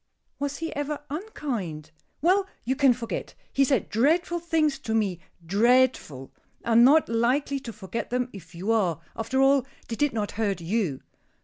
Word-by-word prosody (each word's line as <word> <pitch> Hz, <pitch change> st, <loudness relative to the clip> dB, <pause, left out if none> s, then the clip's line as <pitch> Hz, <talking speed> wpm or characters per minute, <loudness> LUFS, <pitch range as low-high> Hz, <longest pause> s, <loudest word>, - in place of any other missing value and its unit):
"Was 285 Hz, 0 st, -2 dB
he 325 Hz, -1 st, -5 dB
ever 290 Hz, +1 st, -3 dB
unkind?" 235 Hz, -, -4 dB, 0.3 s
"Well, 380 Hz, +3 st, +3 dB, 0.2 s
you 260 Hz, +3 st, 0 dB
can 275 Hz, -1 st, +5 dB
forget! 235 Hz, -1 st, -4 dB, 0.2 s
He 275 Hz, -, +4 dB
said 265 Hz, -4 st, +1 dB
dreadful 330 Hz, +9 st, +2 dB
things 315 Hz, -4 st, +1 dB
to 225 Hz, -5 st, -2 dB
me 200 Hz, -6 st, 0 dB, 0.3 s
dreadful. 210 Hz, -, +2 dB, 0.3 s
I 235 Hz, -, -1 dB
am 230 Hz, +1 st, +7 dB
not 300 Hz, +5 st, +6 dB
likely 255 Hz, +5 st, +1 dB
to 245 Hz, -3 st, -7 dB
forget 215 Hz, +1 st, -5 dB
them 250 Hz, 0 st, -1 dB
if 175 Hz, -3 st, -12 dB
you 190 Hz, +6 st, -2 dB
are. 190 Hz, -8 st, +1 dB, 0.2 s
After 230 Hz, +4 st, -1 dB
all, 275 Hz, -1 st, +4 dB, 0.3 s
they 230 Hz, -, -2 dB
did 290 Hz, +3 st, +1 dB
not 210 Hz, -2 st, -2 dB
hurt 205 Hz, -3 st, -1 dB
you." 170 Hz, -, -1 dB
240 Hz, 170 wpm, -26 LUFS, 205-285 Hz, 0.3 s, am